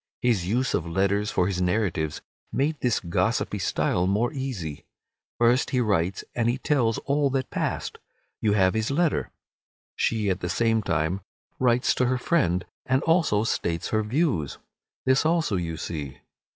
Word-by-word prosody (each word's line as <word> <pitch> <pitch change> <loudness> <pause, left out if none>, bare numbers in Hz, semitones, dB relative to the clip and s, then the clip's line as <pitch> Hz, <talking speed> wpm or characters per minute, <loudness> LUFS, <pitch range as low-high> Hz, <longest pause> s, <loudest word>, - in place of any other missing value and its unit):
His 110 -8 +2
use 125 +6 +1
of 85 - -1
letters 100 +4 +1
for 90 - +1
his 90 -1 -1
narratives 90 -5 0 0.3
made 150 +3 0
this 120 -3 +1
gossipy 85 -2 0
style 90 +1 +1
more 110 +8 +1
easy. 115 - -4 0.5
First 120 +2 +3
he 125 - +1
writes 95 -5 0
and 120 -1 +1
he 120 - 0
tells 130 -6 +1
all 140 0 +2
that 135 -1 -2
passed. - - -3 0.4
You 105 -2 +2
have 95 -3 +3
his 110 0 0
letter. 160 +3 +1 0.7
She 110 -2 0
at 90 - -1
the 90 - -3
same 115 +4 +2
time 85 +1 -1 0.4
writes 125 -1 +3
to 125 - +1
her 130 +1 +1
friend, 120 - +1 0.2
and 130 +1 +2
also 160 - +3
states 85 -6 -1
her 110 - +1
views. 110 - 0 0.5
This 130 +1 +4
also 160 - +1
you 85 -3 -2
see. 70 -5 -5
110 Hz, 160 wpm, -26 LUFS, 90-130 Hz, 0.7 s, This